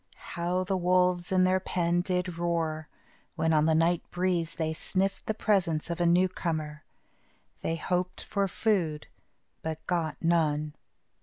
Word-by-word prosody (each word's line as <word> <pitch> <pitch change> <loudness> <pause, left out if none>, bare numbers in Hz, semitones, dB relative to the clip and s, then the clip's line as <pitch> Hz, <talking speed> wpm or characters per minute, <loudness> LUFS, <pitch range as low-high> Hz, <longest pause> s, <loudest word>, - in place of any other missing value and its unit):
How 175 +2 0
the 190 +1 -1
wolves 180 0 +2
in 185 -1 +4
their 185 +1 +3
pen 175 -1 0
did 180 -1 -2
roar, 165 -2 -1 0.5
when, 160 -1 +1
on 155 -1 +4
the 160 0 +3
night 165 +1 +3
breeze, 175 -2 -1
they 160 -1 -1
sniffed 190 +4 -2
the 220 - 0
presence 175 -7 +1
of 170 +1 -3
a 175 - +3
newcomer! 165 -4 0 0.8
They 165 - -1
hoped 180 +2 -2
for 200 -2 0
food, 175 -7 0 0.6
but 160 0 -5
got 170 -3 -1
none. 155 -3 +1
175 Hz, 145 wpm, -29 LUFS, 160-185 Hz, 0.8 s, in